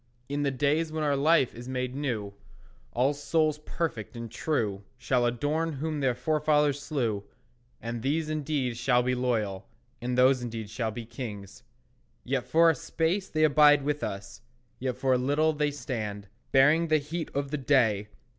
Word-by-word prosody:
In 145 +1 -2
the 145 - +2
days 145 +4 0
when 155 0 -2
our 145 -1 +2
life 145 -1 +3
is 120 +2 -9
made 125 -1 -2
new, 120 -8 -3 0.6
All 130 +4 +2
souls 155 +1 0
perfect 150 - -4
and 115 -2 -7
true 105 -10 -1
Shall 120 0 +1
adore 150 +7 -1
whom 150 +2 -3
their 130 -3 +1
forefathers 150 +1 +1
slew; 115 -10 -2 0.6
And 115 0 -5
these 150 +5 0
indeed 145 -5 -2
shall 125 0 +2
be 125 +1 +1
loyal, 110 -6 -1 0.3
And 125 +1 -2
those 130 0 +5
indeed 115 -3 -5
shall 115 -1 -2
be 115 +1 -6
kings. 105 -5 -8 0.6
Yet 130 -1 -2
for 165 +1 +5
a - - -1
space 170 +5 -1
they 155 0 +1
abide 150 -1 +6
with 150 +1 -1
us, 100 0 -6 0.4
Yet 130 -1 -2
for 130 -1 +2
a 125 - +2
little 145 +5 +2
they 150 0 0
stand, 110 -8 -5 0.2
Bearing 150 +5 +5
the 155 -1 +4
heat 160 +3 -4
of 140 0 -2
the 150 - -1
day. 115 -7 +2
135 Hz, 170 wpm, -28 LUFS, 120-150 Hz, 0.6 s, abide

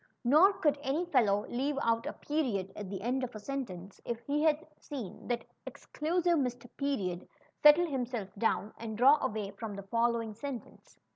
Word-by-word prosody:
Nor 310 +11 +6
could 295 -6 +1
any 295 +5 0
fellow 215 -11 +2
leave 275 +4 -1
out 230 +1 +1
a - - -3
period 240 -11 -2
at 205 -3 -6
the 195 -1 -5
end 255 +3 0
of 245 -2 -4
a - - -5
sentence, 205 -7 -6
if 235 -1 -3
he 290 +3 0
had 310 0 +2
seen 260 -10 -7
that 240 -1 -1 0.2
exclusive 340 +1 0
Mr. 245 -2 -2
Period 200 -12 -2 0.3
settle 300 +4 +8
himself 245 - -3
down 210 0 0
and 220 -1 -5
draw 275 +5 +6
away 215 -5 -2
from 205 0 -6
the 200 - -7
following 230 +1 0
sentence. 250 +2 -8
245 Hz, 170 wpm, -31 LUFS, 215-290 Hz, 0.3 s, settle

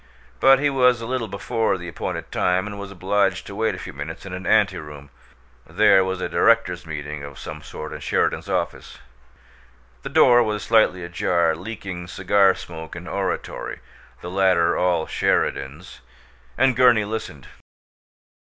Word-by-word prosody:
But 135 0 +6
he 145 +1 +1
was 125 -3 +3
a 115 - -6
little 125 -1 -2
before 100 +1 -1
the 85 -1 -8
appointed 85 - -5
time 90 +1 +1
and 105 -1 -7
was 100 0 -7
obliged 95 0 0
to - - -9
wait 110 +2 -1
a - - -9
few - - -8
minutes 75 +7 -7
in 95 - -7
an 90 0 -6
anteroom 75 -9 0 0.6
there 95 - +4
was 95 0 -3
a - - -2
directors' 90 -7 +2
meeting 75 -1 -6
of 70 -1 -9
some - - -8
sort - - -8
in - - -7
Sheridan's - - -1
office. - - -3 1.0
The - - -6
door 120 -1 +6
was 105 -2 -1
slightly 110 -5 +3
ajar, 85 -1 0
leaking 90 -1 -7
cigar 95 +1 +3
smoke 80 -1 -9
and 85 +1 -8
oratory, 95 -1 -4 0.4
the 90 - -7
latter 95 -3 +3
all 90 -3 +1
Sheridan's, 75 +1 -2 0.6
and 130 0 +3
Gurney 120 -4 +5
listened. 100 - -6
95 Hz, 155 wpm, -22 LUFS, 85-110 Hz, 1.0 s, But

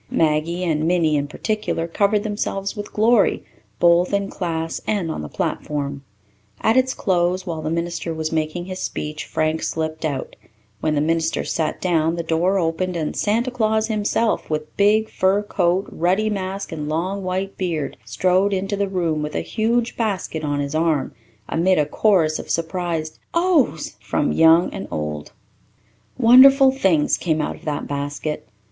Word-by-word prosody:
Maggie 160 +3 +1
and 160 -2 0
Minnie, 165 -3 +2
in 145 0 0
particular, 210 0 -2
covered 200 +4 +1
themselves 205 -2 -3
with 205 -1 -6
glory, 220 0 +3 0.4
both 175 +2 +4
in 200 0 -2
class 165 -3 -3
and 195 -6 0
on - - -4
the 75 - -7
platform. 140 - -3 0.6
At 220 - +2
its 260 0 +2
close, 185 -1 0
while 165 -3 -4
the 155 - -3
minister 170 +1 -2
was 160 -1 -3
making 160 +2 -2
his 185 0 -6
speech, 150 0 -4
Frank 155 0 -1
slipped 160 0 -3
out; 140 -4 -3 0.4
when 155 -1 0
the 145 - +1
minister 165 +1 0
sat 160 -2 -2
down 165 -2 +1
the 170 - -3
door 170 +4 +1
opened 175 +1 -1
and 155 -3 -2
Santa 230 +5 0
Claus 220 -2 +1
himself, 215 +1 0
with 155 0 -4
big 215 +2 +3
fur 195 +1 +1
coat, 185 -1 +1
ruddy 190 +6 +1
mask, 195 -1 -4
and 150 -2 -4
long 185 +6 -2
white 185 +1 -3
beard, 165 -6 -2
strode 185 - +1
into 195 +1 -1
the 200 -1 -1
room 170 -5 -1
with 150 0 -4
a - - 0
huge 230 +2 0
basket 195 -8 -2
on 145 -1 -1
his 140 0 -3
arm, 155 -3 0 0.3
amid 180 +3 +2
a 150 - +3
chorus 160 -2 +2
of - - -8
surprised 165 -2 -2 0.2
"Ohs" 305 - +1
from 105 +8 0
old 165 +2 +5
and - - -6
young. 75 -1 -4 0.9
Wonderful 265 +3 +7
things 190 - +2
came 160 -3 0
out 150 - -2
of - - -18
that 150 -2 -3
basket. 145 +2 -4
175 Hz, 165 wpm, -21 LUFS, 155-200 Hz, 0.9 s, Wonderful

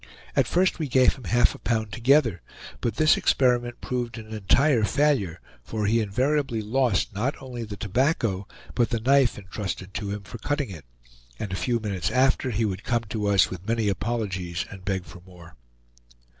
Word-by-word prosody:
At - - +3
first 185 0 +2
we 155 - -1
gave 130 0 +4
him 130 - -12
half 120 +1 +3
a - - -12
pound 110 -3 -1
together, 120 - +3 0.4
but 115 -3 -2
this 155 +3 +4
experiment 120 -2 +1
proved 120 -2 -3
an 110 -1 -9
entire 115 +4 +3
failure, 120 - +1 0.2
for 105 - -3
he 115 +3 +3
invariably 130 +4 0
lost 110 -1 +1
not 120 +8 -2
only 125 -3 -6
the 105 -2 -7
tobacco, 105 - 0 0.3
but 120 -2 +1
the 115 - -1
knife 135 +2 +3
intrusted 95 -1 -6
to 100 -1 -3
him 100 0 -4
for 115 +3 -9
cutting 145 -1 -2
it, 80 -8 -10 0.5
and 95 - -5
a - - 0
few 120 +4 0
minutes 100 -5 -2
after 130 0 +2
he 115 -1 0
would 100 0 -3
come 120 -2 0
to 105 -1 -2
us 100 -2 +4
with 95 +2 -8
many 115 -2 +1
apologies 95 -5 -2
and 95 -2 -10
beg 95 -2 -1
for 90 - -12
more. 85 -4 -15
110 Hz, 185 wpm, -25 LUFS, 100-125 Hz, 0.5 s, gave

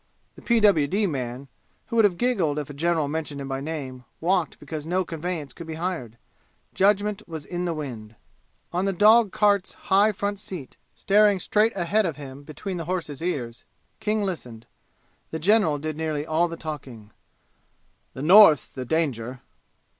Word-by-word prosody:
(The - - -15
P.W.D. 205 - +3
man, 130 -5 -4 0.4
who 230 - -6
would 225 -2 +6
have 185 -4 +1
giggled 190 -12 +1
if 150 -1 -4
a - - -9
general 160 0 0
mentioned 150 -1 -4
him 135 - -5
by 135 0 -3
name, 135 -4 -6 0.2
walked 180 -1 0
because 155 -1 -7
no 185 +2 0
conveyance 165 -4 -5
could 170 - -10
be 160 - -5
hired. 160 -10 -4 0.6
Judgment 205 +1 +2
was 160 -3 -7
in 180 0 -3
the 170 - -1
wind.) 115 -8 -7 0.6
On 180 +2 0
the 195 - 0
dog 215 +2 +5
cart's 205 -2 +2
high 200 +3 +3
front 205 0 -3
seat, 175 -9 -8 0.2
staring 205 -1 +4
straight 215 +5 +2
ahead 185 +4 +1
of 160 - -3
him 140 -1 -9
between 175 +6 -6
the 165 - -5
horse's 165 -5 -4
ears, 125 -10 -3 0.4
King 215 0 0
listened. 125 - -5 0.6
The 160 - -4
general 180 -2 +3
did 155 +1 -4
nearly 155 -2 -2
all 160 +2 +2
the 165 0 -7
talking. 130 -9 -8 1.0
"The 130 - -5
North's 170 - +7
the 130 -1 -7
danger." 125 -5 -2
165 Hz, 165 wpm, -25 LUFS, 145-195 Hz, 1.0 s, North's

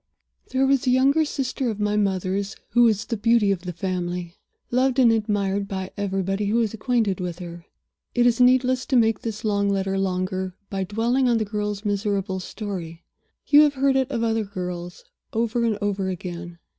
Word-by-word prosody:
"There 260 +1 +2
was 275 0 +2
a - - +5
younger 270 +5 +4
sister 270 -3 -2
of 215 -2 -4
my 210 0 0
mother's 195 0 -1
who 240 +2 +5
was 215 -2 +2
the 235 - -2
beauty 230 -1 +3
of 190 -3 -1
the 180 - -3
family; 180 -1 -3 0.4
loved 255 +1 +2
and 245 -3 +6
admired 205 -2 0
by 190 -2 -4
everybody 195 0 -1
who 210 - 0
was 230 -2 +1
acquainted 220 -4 0
with 180 -2 -4
her. 170 -1 -9 0.5
It 245 0 +3
is 245 0 +3
needless 255 0 +3
to 270 - +1
make 225 -3 +3
this 220 -1 -5
long 200 -1 +1
letter 195 -1 0
longer 185 0 -2 0.2
by 195 -1 -2
dwelling 235 +6 +1
on 235 - +3
the 220 - 0
girl's 210 0 -3
miserable 200 -2 -1
story. 180 -4 -6 0.4
You 295 0 +7
have 295 -2 +3
heard 270 0 +2
it 265 -1 +1
of 235 -4 -1
other 225 -1 +1
girls, 180 -3 -6 0.3
over 235 +1 0
and 225 -3 +1
over 200 -2 -1
again. 175 -1 -6
205 Hz, 185 wpm, -24 LUFS, 190-235 Hz, 0.5 s, You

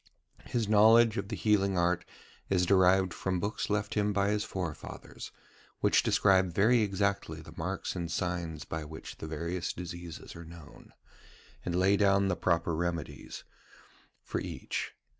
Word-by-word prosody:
His 115 -3 -1
knowledge 110 +2 +6
of 100 - -2
the 110 - -4
healing 100 -3 +2
art 90 +1 +1 0.4
is 90 -2 +2
derived 95 0 +4
from 95 -1 -2
books 100 +4 -2
left 105 0 -1
him 105 -1 +1
by 100 0 +2
his 105 0 0
forefathers, 90 -5 -6 0.5
which - - +4
describe 95 -2 +3
very 115 +4 +4
exactly 100 -1 -1
the - - -12
marks 95 +5 -3
and 85 -2 -3
signs 85 -3 -3
by 80 0 -4
which 80 +1 -9
the 80 - -6
various 85 +3 -3
diseases 85 -1 -8
are 85 - -8
known, 80 -2 -13 0.7
and 85 - -2
lay 95 +2 +4
down 100 -1 +3
the 90 - +1
proper 85 -2 +1
remedies 85 -3 -4 0.8
for - - -3
each. - - -4
95 Hz, 150 wpm, -30 LUFS, 85-100 Hz, 0.8 s, knowledge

